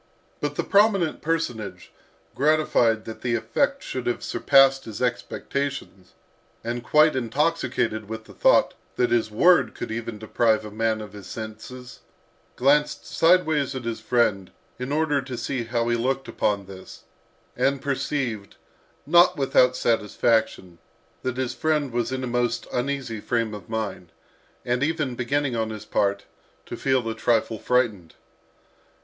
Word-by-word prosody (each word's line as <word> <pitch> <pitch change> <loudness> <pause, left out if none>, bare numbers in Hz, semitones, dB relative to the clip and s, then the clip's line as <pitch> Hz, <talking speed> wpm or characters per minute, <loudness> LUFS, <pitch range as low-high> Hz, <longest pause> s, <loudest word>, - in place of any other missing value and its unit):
But 145 0 -3
the - - -1
prominent 200 -5 +3
personage, 150 -10 -3 0.4
gratified 135 -7 +2
that 110 - -8
the 120 -2 0
effect 275 - 0
should 130 -2 -5
have 120 - -1
surpassed 135 -1 +4
his 110 -2 -7
expectations, 125 -4 -3 0.5
and 120 +1 -3
quite 150 0 +4
intoxicated 125 -4 -1
with 110 0 -6
the - - -15
thought - - +4 0.2
that 125 - +1
his 115 -2 +2
word 175 +12 +4
could - - -5
even 115 -1 -4
deprive 110 0 +1
a 105 - -8
man 110 0 0
of 105 -2 -9
his 100 -3 -10
senses, 120 +4 -8 0.6
glanced 145 +3 +2
sideways 160 -5 +2
at 130 - -5
his 115 -1 -3
friend 110 -4 +1 0.3
in 125 +2 -4
order 150 -2 +1
to 130 -2 -7
see 120 0 -3
how 115 0 -1
he 120 - +2
looked 130 +3 -1
upon 100 -2 -1
this, 95 -1 -12 0.5
and 140 0 +1
perceived, 130 -6 -3 0.5
not 175 +1 +5
without 125 -2 +3
satisfaction, 110 -5 0 0.4
that 130 -1 -3
his 130 -2 -2
friend 150 -4 0
was 120 0 -1
in 130 0 -3
a - - -2
most 120 -1 -1
uneasy 125 -3 -2
frame 115 0 -1
of 105 +2 -9
mind, 105 -6 -4 0.5
and 125 +1 0
even 145 -3 0
beginning 130 +2 -1
on 110 -1 -1
his 110 -1 -7
part, 100 -1 0 0.4
to - - -6
feel 130 -3 0
a 115 - -1
trifle 110 -1 0
frightened. 110 -10 0
120 Hz, 145 wpm, -24 LUFS, 110-140 Hz, 0.6 s, not